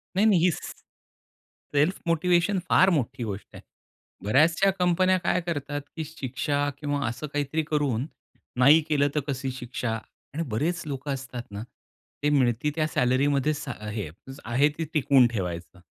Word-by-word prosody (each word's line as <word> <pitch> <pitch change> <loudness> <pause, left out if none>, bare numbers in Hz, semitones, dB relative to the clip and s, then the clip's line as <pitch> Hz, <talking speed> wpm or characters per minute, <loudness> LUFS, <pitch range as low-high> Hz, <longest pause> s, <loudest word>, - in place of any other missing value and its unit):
नाही-नाही, 190 -3 +4
स - - -6 1.0
self 150 +7 +2
motivation 175 +3 +2
फार 185 - +6
मोठी 130 -6 -1
गोष्ट 105 -3 -5
आहे. - - -10 0.6
बऱ्याचशा 160 - +4
कंपन्या 185 +1 +3
काय 180 - +2
करतात 145 -4 -3
की 160 - -3
शिक्षा 145 0 -2
किंवा 145 -1 -1
असं 120 +7 -4
काहीतरी 145 +2 -1
करून, 145 -6 0 0.5
नाही 145 +6 +7
केलं 145 -2 +3
तर - - +3
कशी 135 -1 -2
शिक्षा? 125 -2 -4 0.4
आणि 160 +3 -2
बरेच 155 +11 -1
लोकं 140 0 -4
असतात 130 -2 -6
ना, 100 +1 -5 0.6
ते 150 - +3
मिळती 130 0 +2
त्या 155 -1 +1
सॅलरी 130 -1 +2
मध्ये 145 +1 +2
सा 145 -2 -5 0.2
हे 105 -6 -4 0.4
आहे 130 +6 +3
ते 165 - -2
टिकवून 135 -4 +5
ठेवायचं. 90 -5 -5
145 Hz, 145 wpm, -26 LUFS, 125-160 Hz, 1.0 s, नाही